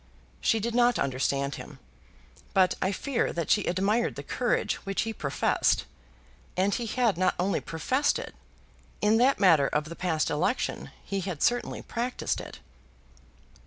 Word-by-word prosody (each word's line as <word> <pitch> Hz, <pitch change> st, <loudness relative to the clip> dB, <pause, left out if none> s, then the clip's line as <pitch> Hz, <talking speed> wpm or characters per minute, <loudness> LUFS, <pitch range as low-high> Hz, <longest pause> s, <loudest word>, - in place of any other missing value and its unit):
She 225 Hz, -, +2 dB
did 230 Hz, +2 st, -2 dB
not 245 Hz, 0 st, +4 dB
understand 140 Hz, +1 st, 0 dB
him, -, -, -11 dB, 0.8 s
but 185 Hz, -1 st, +5 dB
I 190 Hz, -, +1 dB
fear 250 Hz, +5 st, -1 dB
that 170 Hz, -2 st, -2 dB
she 205 Hz, -, +3 dB
admired 200 Hz, +6 st, +1 dB
the -, -, -6 dB
kind -, -, -12 dB
of -, -, -2 dB
courage -, -, +1 dB
which 195 Hz, -1 st, -1 dB
he 225 Hz, -1 st, -3 dB
professed. 140 Hz, -8 st, +1 dB, 0.7 s
And 195 Hz, +2 st, +2 dB
he 240 Hz, -2 st, -2 dB
had 230 Hz, -5 st, +1 dB
not 185 Hz, -1 st, +2 dB
only 190 Hz, +3 st, 0 dB
professed 260 Hz, -, 0 dB
it: -, -, -7 dB, 0.7 s
in 210 Hz, +1 st, +3 dB
that 260 Hz, +4 st, +3 dB
matter 165 Hz, -8 st, +5 dB
of 150 Hz, -, 0 dB
the 170 Hz, -, -7 dB
past 165 Hz, -4 st, 0 dB
election 165 Hz, +12 st, -1 dB
he 195 Hz, -1 st, -3 dB
had 180 Hz, -5 st, -3 dB
certainly 245 Hz, 0 st, 0 dB
practised 245 Hz, +2 st, -2 dB
it. -, -, -10 dB
195 Hz, 165 wpm, -28 LUFS, 170-235 Hz, 0.8 s, but